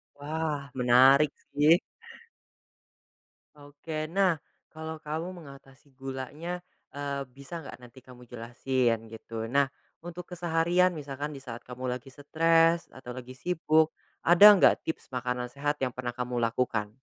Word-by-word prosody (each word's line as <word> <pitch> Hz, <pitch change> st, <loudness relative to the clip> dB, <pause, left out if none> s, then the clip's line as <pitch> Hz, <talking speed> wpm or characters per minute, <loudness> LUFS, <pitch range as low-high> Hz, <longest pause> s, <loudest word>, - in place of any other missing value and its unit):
Wah, 150 Hz, 0 st, -3 dB, 0.2 s
menarik 130 Hz, +4 st, +6 dB, 0.2 s
sih. 150 Hz, +4 st, +5 dB, 1.8 s
Oke 150 Hz, +2 st, -6 dB
nah, 185 Hz, -2 st, +3 dB, 0.4 s
kalau 160 Hz, 0 st, -6 dB
kamu 155 Hz, +3 st, -4 dB
mengatasi 140 Hz, 0 st, -16 dB
gulanya, 140 Hz, +6 st, -5 dB, 0.3 s
eee, 140 Hz, -1 st, -3 dB
bisa 140 Hz, +5 st, -8 dB
nggak -, -, -9 dB
nanti 125 Hz, +1 st, -14 dB
kamu 125 Hz, -1 st, -15 dB
jelasin 120 Hz, 0 st, -1 dB
gitu. 110 Hz, 0 st, -7 dB
Nah, 140 Hz, +3 st, +2 dB, 0.3 s
untuk 175 Hz, 0 st, -8 dB
keseharian 175 Hz, +1 st, +2 dB
misalkan 145 Hz, 0 st, -5 dB
disaat 125 Hz, -4 st, -8 dB
kamu 125 Hz, +1 st, -6 dB
lagi 130 Hz, +2 st, -10 dB
stress 165 Hz, +3 st, +3 dB
atau 130 Hz, -1 st, -10 dB
lagi 130 Hz, 0 st, -8 dB
sibuk 160 Hz, +1 st, +2 dB, 0.4 s
ada 190 Hz, +5 st, +10 dB
nggak 195 Hz, -, +4 dB
tips 160 Hz, -, -4 dB
makanan 125 Hz, -1 st, -2 dB
sehat 145 Hz, +2 st, -2 dB
yang 125 Hz, -2 st, -1 dB
pernah 125 Hz, -1 st, -3 dB
kamu 125 Hz, 0 st, -4 dB
lakukan? 115 Hz, -2 st, -1 dB
140 Hz, 125 wpm, -28 LUFS, 125-160 Hz, 1.8 s, ada